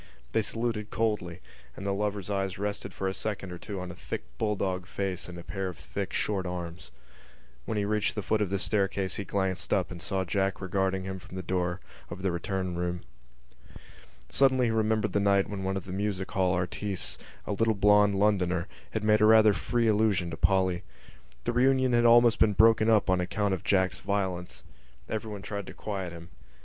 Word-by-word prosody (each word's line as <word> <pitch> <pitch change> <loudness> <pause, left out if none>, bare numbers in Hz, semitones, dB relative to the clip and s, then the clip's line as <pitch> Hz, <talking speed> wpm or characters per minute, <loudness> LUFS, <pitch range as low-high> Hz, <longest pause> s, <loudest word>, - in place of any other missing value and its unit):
They 110 - +2
saluted 115 -1 -2
coldly; 95 -5 -1 0.4
and 100 - -6
the 100 - +1
lover's 105 0 -2
eyes 95 -2 -1
rested 100 +1 -3
for 95 - -3
a 95 - -1
second 100 -3 -4
or 90 - -7
two 100 0 -6
on 90 -1 -5
a - - -8
thick - - -5 0.2
bulldog 95 -4 -1
face 95 -2 -3
and 90 - -8
a 85 - -8
pair 95 0 -3
of 90 -4 -6
thick - - -5
short 95 -3 -1
arms. 90 -1 -6 0.8
When 110 - -2
he 100 - +1
reached 105 0 0
the 105 - -3
foot 110 +3 +1
of 100 - +1
the 100 - 0
staircase 95 -1 0
he 100 - -4
glanced 95 -2 -2
up - - +1
and 85 -1 -7
saw 95 +5 -1
Jack 95 +2 0
regarding 95 0 0
him 95 0 -5
from 90 - -12
the 95 - -4
door 90 0 -1 0.3
of 90 +1 -7
the 95 - +1
return 90 +1 -2
room. 90 0 -2 1.3
Suddenly 130 - +3
he 115 - +1
remembered 110 -1 +1
the - - +3
night 100 -1 +3
when 100 -2 -5
one 95 +1 -1
of 95 - -5
the 90 - -6
music 100 -1 -2
hall 95 -1 +2
artistes, 90 +2 -2 0.3
a - - -3
little 110 +2 +2
blond 105 0 +5
Londoner, 95 -3 +2 0.3
had 110 - -2
made 105 0 +4
a - - +7
rather 110 -1 +7
free 120 +3 0
allusion 105 -5 +2
to - - -3
Polly. 95 -2 +2 0.6
The 120 - -1
reunion 130 0 +3
had 120 - +5
been 120 - +3
almost 120 0 +6 0.2
broken 110 0 +6
up 110 -2 +4
on 95 -1 +3
account 100 +2 0
of 95 - -3
Jack's 95 -2 +2
violence. 95 -3 -2 0.4
Everyone 105 -2 -4
tried 100 -1 -5
to - - -8
quiet 95 -4 -4
him. 85 0 -10
100 Hz, 200 wpm, -29 LUFS, 95-105 Hz, 1.3 s, a